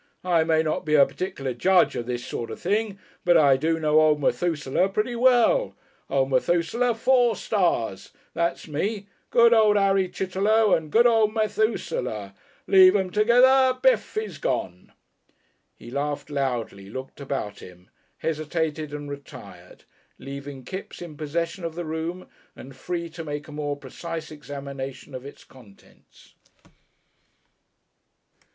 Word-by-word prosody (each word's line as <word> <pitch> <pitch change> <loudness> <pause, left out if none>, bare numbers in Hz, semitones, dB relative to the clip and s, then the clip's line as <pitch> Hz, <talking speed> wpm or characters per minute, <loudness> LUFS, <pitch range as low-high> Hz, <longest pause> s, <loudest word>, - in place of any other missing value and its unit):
I 170 -3 +3
may 160 0 +2
not 155 - -2
be 155 0 +1
a 140 -2 +7
particular 135 -8 -4
judge 180 +9 +3
of 120 - -4
this 125 0 -4
sort 115 - -5
of - - -7
thing, 205 +2 -1 0.3
but 175 -1 +5
I 140 -4 +5
do 160 +4 0
know 155 0 +4
old 155 -1 +3
Methusaleh 160 +3 0
pretty 220 +5 -1
well. 255 - +3 0.3
Old 135 0 +1
Methusaleh 175 - +1
four 245 -1 +3
stars. 145 - -1 0.2
That's 170 0 -2
me! 195 +7 -3 0.2
Good 235 0 +5
old 215 -2 +5
Harry 195 -2 +2
Chitterlow 200 +4 +1
and 155 -2 -5
good 235 +2 +5
old 225 -2 +3
Methusaleh. 210 - -1 0.3
Leave 190 0 +7
'em 190 -2 0
together. 255 +5 +4
Bif! - - +2
He's 435 +1 -4
gone!" - - -3 0.8
He 120 - -12
laughed 145 +2 -3
loudly, 120 -8 -3
looked 130 +5 -8
about 135 -7 -4
him, 90 0 -14 0.3
hesitated 155 -1 -3
and 145 0 -7
retired, 140 -1 -11 0.3
leaving 140 -1 -8
Kipps 185 +3 -7
in 165 -3 -9
possession 170 +4 -3
of 165 -1 -4
the 175 0 -4
room 160 +3 -4 0.3
and 135 0 -12
free 170 +5 -4
to 165 +1 -8
make 145 -1 -6
a - - -11
more 145 -1 -3
precise 160 +5 -7
examination 140 -2 -8
of 130 +1 -7
its 140 - -13
contents. 110 -7 -20
160 Hz, 140 wpm, -25 LUFS, 140-200 Hz, 0.8 s, a